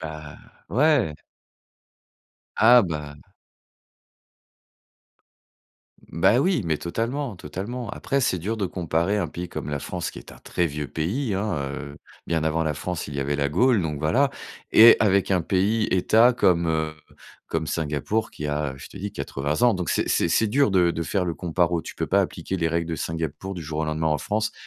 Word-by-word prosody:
Bah, 75 -2 -8 0.3
ouais. 130 - +2 1.4
Ah 120 +3 +7
bah 75 -4 -4 2.9
Mmh 85 - -8
bah 115 - +5
oui 175 - +1
mais 80 -2 0
totalement, 115 +5 -3
totalement. 105 +11 -6
Après, 140 0 -1
c'est 95 -7 +1
dur 105 +7 -3
de 100 -3 -1
comparer 90 +3 -1
un 90 - 0
pays 90 +1 -6
comme - - -6
la 70 -1 -2
France 90 +3 -4
qui - - -10
est - - -12
un - - -14
très 85 - -1
vieux 75 -1 -4
pays, 100 - -2
hein, 100 -1 -1 0.2
heu, 70 -1 -8 0.3
bien 80 -1 0
avant 80 +1 +1
la 75 - 0
France, 85 +2 -4
il 70 - -7
y 70 - -2
avait 70 +1 -1
la 70 0 0
Gaule, 105 - +3
donc 75 -3 -3
voilà. 130 - +2 0.4
Et 115 +2 +9
avec 100 -2 +2
un 95 -2 +3
pays 105 +5 +1
État 110 +6 +4
comme 85 -7 +2
heu, 80 -1 0 0.6
comme 80 -1 -2
Singapour 80 +9 -2
qui 75 - -6
a, 75 -2 -2
je - - -10
te - - -14
dis, 100 +1 -4
80 70 - -3
ans. 120 -4 +5
Donc, 90 -3 -3
c'est - - 0
c'est - - +2
c'est 110 +6 +2
dur 130 +1 +2
de 90 -3 +3
de 85 - -3
faire 95 +2 -1
le 85 -2 -2
comparo 85 -1 0
tu - - -9
peux - - -2
pas - - +3
appliquer 95 - -3
les 80 -2 0
règles 85 0 -1
de 80 - -2
Singapour 80 +4 -4
du 85 - -6
jour 75 0 -4
au - - 0
lendemain 80 +1 -1
en 75 -1 +1
France, 110 +6 -1
85 Hz, 190 wpm, -24 LUFS, 80-105 Hz, 2.9 s, Et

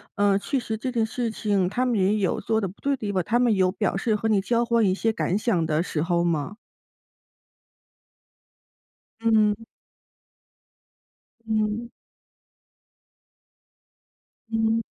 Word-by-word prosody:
呃 200 -1 +3
确 270 +5 -1
实 220 -2 -4
这 255 +3 -3
件 230 -2 +1
事 235 +1 -2
情 200 -4 0
他 250 +5 0
们 245 -2 +1
也 195 +3 +3
有 195 -4 0
做 220 0 0
得 195 - -1
不 185 - -13
对 280 0 +1
的 - - -2
地 210 -4 -3
方， 185 -3 0
他 235 +7 +1
们 245 -3 +3
有 185 -2 +2
表 190 - -1
示 215 +2 0
和 220 +1 -1
你 205 -3 +3
交 235 +3 +1
换 235 -1 +2
一 185 -1 +2
些 225 +2 0
感 195 -3 0
想 210 -7 +1
的 155 +1 +1
时 155 -4 -3
候 170 0 +1
吗？ 170 +4 -1 2.6
嗯。 220 -1 +2 1.8
嗯。 220 +2 -1 2.6
嗯。 225 0 +1
215 Hz, 155 characters per minute, -25 LUFS, 190-230 Hz, 2.6 s, 呃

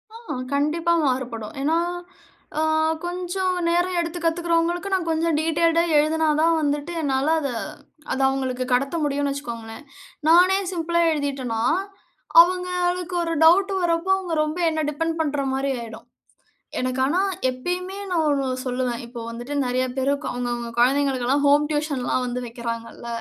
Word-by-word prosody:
ஆமா 460 0 -7 0.2
கண்டிப்பா 315 +4 +1
மாறுபடும். 250 -5 -2
ஏன்னா 310 +4 +2 0.8
அ - - +2 0.4
கொஞ்சம் 365 +1 -2
நேரம் 350 +1 +1
எடுத்து 340 +1 -3
கத்துக்கிறவங்களுக்கு, 340 +2 0
நான் 365 -3 0
கொஞ்சம் 325 -1 +1
டீட்டெயில்டா 330 +1 +2
எழுதினா 315 +2 +2
தான் 330 0 +3
வந்துட்டு, 290 +2 -1
என்னால 280 +1 +1
அத 280 - -2 0.6
அத - - -1
அவங்களுக்கு 260 -1 -2
கடத்த 275 +5 +1
முடியும்னு 285 -1 0
வச்சுக்கோங்களேன். 235 -3 -7 0.4
நானே 360 +3 +6
சிம்பிளா 340 -1 0
எழுதிட்டேனா, 270 -6 -2 0.8
அவங்களுக்கு 360 0 0
ஒரு 330 0 -2
டவுட் 390 +4 +5
வர்றப்போ, 340 +2 +1
அவங்க 360 -4 -3
ரொம்ப 305 +3 -3
என்ன 315 -1 -1
டிபெண்ட் 330 +2 -2
பண்ற 290 -2 -1
மாரி 270 +1 0
ஆயிடும் 225 0 -10 0.7
எனக்கு 255 0 -1
ஆனா 300 +7 +1 0.3
எப்பயுமே 360 +9 -3
நான் 340 -3 +2
ஒன்னு 275 -2 0 0.2
சொல்லுவேன். 250 -2 -2
இப்ப 235 +1 -9
வந்துட்டு 240 +5 -6
நெறைய 255 0 0
பேரு 265 +1 +1 0.2
அவங்க, 245 0 -3
அவங்க 235 -1 -5
கொழந்தைகளுக்கெல்லாம் 270 +1 +2
ஹோம் 290 +1 +5
டியூஷன்லாம் 295 -4 -1
வந்து 250 0 -3
வைக்கிறாங்கல்ல. 230 0 -6
295 Hz, 135 wpm, -23 LUFS, 255-340 Hz, 0.8 s, நானே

